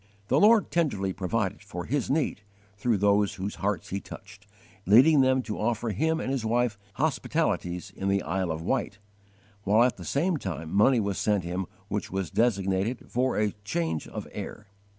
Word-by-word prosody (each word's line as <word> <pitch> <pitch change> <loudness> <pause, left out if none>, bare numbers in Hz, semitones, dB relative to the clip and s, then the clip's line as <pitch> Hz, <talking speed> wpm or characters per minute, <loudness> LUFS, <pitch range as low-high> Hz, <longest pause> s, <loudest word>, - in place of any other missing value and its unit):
The 135 - +4
Lord 215 +2 +5
tenderly 105 - 0
provided 95 +1 -2
for 90 -4 -7
his 140 +1 -1
need 140 -7 0 0.3
through 110 +2 +1
those 100 0 +2
whose 95 +2 -4
hearts 100 -4 -1
He 100 - -2
touched, 100 +1 -12 0.4
leading 135 +9 +7
them 130 0 +3
to 110 - -5
offer 115 +1 -1
him 160 - 0
and 135 - -2
his 135 -4 -1
wife 120 0 +1 0.2
hospitalities 105 - -1
in 95 - -3
the 100 0 +1
Isle 95 +1 -1
of 80 0 -3
Wight, 110 -1 -1 0.6
while 105 +4 +4
at 125 - +1
the - - -9
same 165 +4 0
time 80 - -5
money 115 +5 +5
was 100 -3 -1
sent 105 -3 +1
him 90 +2 -3 0.2
which 105 -1 -3
was 95 -2 -3
designated 100 0 0
for 125 +1 +1
'a 105 -1 +2
change 80 -5 -2
of - - -7
air.' - - -7
105 Hz, 175 wpm, -27 LUFS, 95-125 Hz, 0.6 s, leading